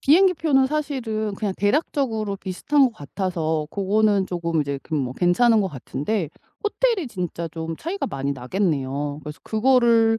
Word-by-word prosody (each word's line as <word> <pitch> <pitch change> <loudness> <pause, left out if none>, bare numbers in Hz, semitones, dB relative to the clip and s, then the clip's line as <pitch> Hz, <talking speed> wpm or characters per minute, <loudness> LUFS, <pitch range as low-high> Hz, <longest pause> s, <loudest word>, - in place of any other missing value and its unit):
비행기표는 320 -4 +4
사실은 250 -8 -2
그냥 200 -2 -2
대략적으로 220 -3 0
비슷한 240 +10 +1
것 245 - +1
같아서 160 -2 -2
그거는 200 0 +2
쪼금 170 -2 -1
이제 140 -1 -2
그냥 150 -4 -1
뭐 125 - -4
괜찮은 215 - +4
것 195 - 0
같은데 150 - -3 0.4
호텔이 420 - +1
진짜 175 -5 -4
좀 160 0 -5
차이가 370 +5 -3
많이 140 +1 -2
나겠네요. 145 -1 -2
그래서 150 0 -8
그거를 230 -1 +4
200 Hz, 355 characters per minute, -23 LUFS, 160-250 Hz, 0.4 s, 비행기표는